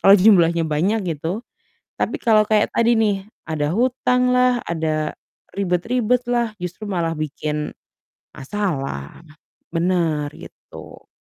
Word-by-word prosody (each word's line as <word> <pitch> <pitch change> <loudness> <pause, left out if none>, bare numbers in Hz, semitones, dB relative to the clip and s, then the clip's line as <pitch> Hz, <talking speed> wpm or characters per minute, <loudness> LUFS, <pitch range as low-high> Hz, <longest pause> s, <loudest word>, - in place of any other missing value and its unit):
kalau 195 +1 +8
jumlahnya 170 -5 +5
banyak 185 +8 0
gitu. 175 - -4 0.6
Tapi - - 0
kalau 215 -2 +4
kayak 215 -1 +2
tadi 235 +1 +3
nih 215 -3 +2 0.3
ada 155 0 -2
hutanglah, 250 0 +2
ada 155 -2 -1 0.4
ribet-ribetlah, 235 +5 0
justru 180 +5 -6
malah 170 -4 -1
bikin 150 0 -3 0.6
masalah, 140 - -4 0.5
benar, 165 -3 +1
gitu. - - -13
185 Hz, 100 wpm, -21 LUFS, 160-225 Hz, 0.6 s, kalau